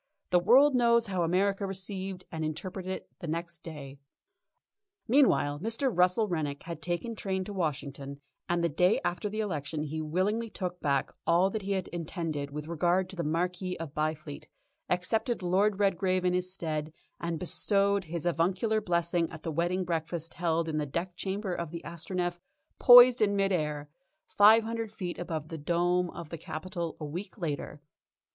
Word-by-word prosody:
The 180 - +6
world 265 +10 +6
knows 235 -2 +4
how 190 -4 -2
America 195 +4 +1
received 190 -1 -5
and 160 -1 -3
interpreted 185 +4 -4
it 190 - -6
the 170 - -6
next 170 +1 -4
day. 140 -4 -9 1.1
Meanwhile 225 - +3
Mr. 230 - 0
Russell 180 +5 +3
Rennick 150 -6 -2
had 165 -2 -7
taken 175 +8 -2
train 190 -3 -2
to 205 - -7
Washington, 140 -5 -3 0.3
and 175 0 +1
the - - +4
day 180 +5 +3
after 175 +4 -1
the 215 +2 -2
election 155 -6 -3
he 155 +1 -4
willingly 195 +9 0
took 180 -3 -4
back 140 -2 +1 0.2
all 175 +3 +4
that 220 - -3
he 200 +1 -2
had 190 -2 -2
intended 165 -4 -4
with 150 +1 -6
regard 175 +3 +1
to - - -9
the 170 - -2
Marquis 180 +4 -1
of 160 -3 -7
Byfleet, 155 -1 -3 0.4
accepted 220 +5 0
Lord 195 +3 +2
Redgrave 185 -2 +1
in 180 - +3
his 180 0 -1
stead, 155 -4 -3 0.3
and 170 -1 -2
bestowed 200 +3 +1
his 170 +1 -5
avuncular 185 +6 +1
blessing 170 -2 0
at 160 -2 -10
the 165 - -2
wedding 175 +4 0
breakfast 165 0 -3
held 165 -1 0
in 155 -1 -1
the 150 - -2
deck 175 +6 -3
chamber 195 0 -3
of 170 -2 -3
the 170 +1 -7
Astronef 175 +1 -3 0.4
poised 245 0 +9
in 205 -1 +3
mid 195 0 +2
air, 150 -4 -1 0.4
five 220 +2 +6
hundred 225 -1 -3
feet 180 -6 -5
above 160 -3 -4
the 165 - -6
dome 175 +3 +1
of 170 -2 -8
the 165 - -6
Capitol, 170 +2 -5
a 155 - -4
week 180 +9 -6
later. 150 -4 -4
175 Hz, 175 wpm, -29 LUFS, 160-195 Hz, 1.1 s, poised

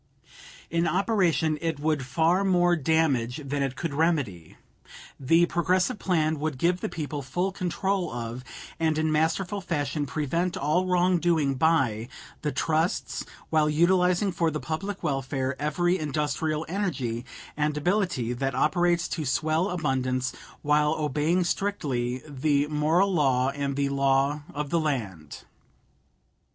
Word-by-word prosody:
In 170 +1 +1
operation 175 -4 +1
it 165 -3 -2
would 155 0 +1
do 130 - -6
far 165 +7 +2
more 175 -2 +3
damage 145 -5 +1
than 140 +1 -2
it 135 -1 -1
could 165 -4 -3
remedy. 140 - -1 0.6
The 165 +6 +4
Progressive 180 +3 +1
plan 155 -4 +1
would 155 -2 -2
give 175 +5 +1
the - - -2
people 150 -2 -4
full 175 +9 -2
control 190 -1 -1
of, 120 +1 -5 0.4
and 160 -1 +1
in 155 0 +1
masterful 170 +6 0
fashion 145 -4 -2
prevent 165 +5 -1
all 155 +6 +1
wrongdoing 175 -5 +2
by, 130 -7 +1 0.3
the 150 - -1
trusts, 160 +5 -1 0.3
while 155 -1 +3
utilizing 180 +4 +3
for 170 -2 +1
the 155 -1 -3
public 190 +6 -4
welfare 135 -1 -1
every 175 +5 +1
industrial 155 +1 -1
energy 145 - -2 0.3
and 150 0 0
ability 175 - 0
that 135 +1 -2
operates 175 +4 +2
to 160 - -3
swell 155 +6 +1
abundance, 130 -6 -1 0.3
while 150 +1 +3
obeying 155 +4 +1
strictly 135 -11 -2
the 145 0 +1
moral 160 +6 +2
law 135 -5 +2
and 140 -1 -3
the 140 0 0
law 140 +1 +2
of 145 -1 -4
the 170 - +2
land. 105 - -3
155 Hz, 135 wpm, -26 LUFS, 140-175 Hz, 0.6 s, The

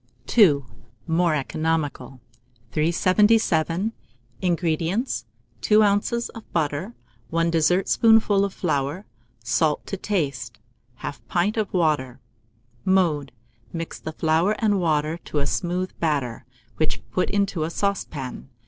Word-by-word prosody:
II. 160 -12 +6 0.4
(More 165 0 +2
Economical.) 150 -2 -2 0.5
377. 185 - +2 0.5
INGREDIENTS. 175 - 0 0.4
2 215 0 +5
oz. 210 +4 +1
of 225 - -12
butter, 160 +7 -1 0.3
1 165 0 +1
dessertspoonful 195 +5 +4
of 200 - -1
flour, 155 +1 -2 0.4
salt 150 +6 +1
to 195 - -4
taste, 140 - -2 0.4
1/2 140 -4 -5
pint 185 +4 +1
of 215 -3 -1
water. 150 -8 0 0.6
Mode. 165 -8 +2 0.4
Mix 165 -1 -5
the 160 - -5
flour 165 +7 +2
and 210 -3 +2
water 155 -1 0
to - - -4
a 140 - +2
smooth 180 +4 -1
batter, 140 -9 -1 0.3
which 135 -8 -1
put 180 - 0
into 200 -5 0
a 155 - -1
saucepan. 160 -10 -3
165 Hz, 110 wpm, -24 LUFS, 150-200 Hz, 0.6 s, II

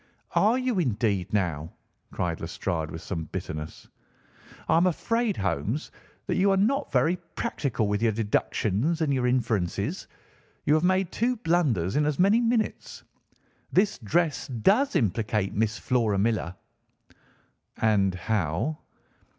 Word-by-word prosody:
"Are 220 +5 +4
you, 255 -6 0
indeed, 105 - 0
now?" 85 -6 -1 0.4
cried 85 -2 -2
Lestrade 80 -1 -3
with 80 +1 -8
some 80 -4 -4
bitterness. 75 0 -6 0.8
"I - - +3
am 175 +2 +4
afraid, 230 +4 0
Holmes, 105 - -2 0.3
that - - -1
you 195 +2 +4
are 195 - +3
not 265 +9 +1
very 170 +3 +2 0.2
practical 120 -6 -1
with 105 +1 -1
your 115 -1 +3
deductions 110 - 0
and 150 -3 +2
your 125 -2 +1
inferences. 115 -8 -1 0.6
You 150 - +4
have 155 +1 +3
made 185 0 +2
two 245 +3 0
blunders 150 - +1
in 150 0 +2
as 150 - -1
many 200 +6 +4
minutes. 230 -1 -1 0.7
This 195 +2 +2
dress 160 - 0
does 200 - +2
implicate 105 -2 0
Miss 110 0 0
Flora 115 -5 +1
Millar." 100 -4 0 1.2
"And 100 -4 +2
how?" 105 - -1
115 Hz, 135 wpm, -26 LUFS, -, 1.2 s, Are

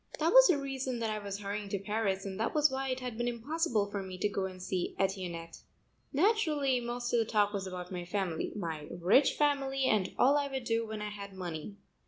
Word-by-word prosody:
That 325 +3 +2
was - - +10
the 355 -6 +4
reason 270 -2 -3
that 225 -2 -1
I 215 - -2
was 200 0 -5
hurrying 205 0 -4
to 200 - -1
Paris 200 -1 -1
and 195 0 -5
that 225 - -1
was 300 -1 +5
why 265 0 -2
it 255 0 -2
had 245 -3 -5
been 240 - 0
impossible 240 -3 0
for 200 - -2
me 185 -1 -7
to 210 - +1
go 195 -2 -2
and 185 -1 -7
see 180 -1 -2
Etiennette. 180 -4 -2 0.5
Naturally 300 - +2
most 240 0 -3
of 240 - +4
the 225 - +2
talk 210 -1 +2
was 195 -2 -3
about 180 -1 -6
my 180 -1 -4
family, 180 -2 -2
my 160 -6 -4
rich 180 +11 +4
family 275 -2 +1
and 205 -6 +2
all 280 +3 +5
I 285 -1 0
would 265 -2 -4
do 230 -1 0
when 215 -1 -5
I 210 - -3
had 200 -1 -8
money. 175 +1 -5
215 Hz, 230 wpm, -32 LUFS, 190-265 Hz, 0.5 s, was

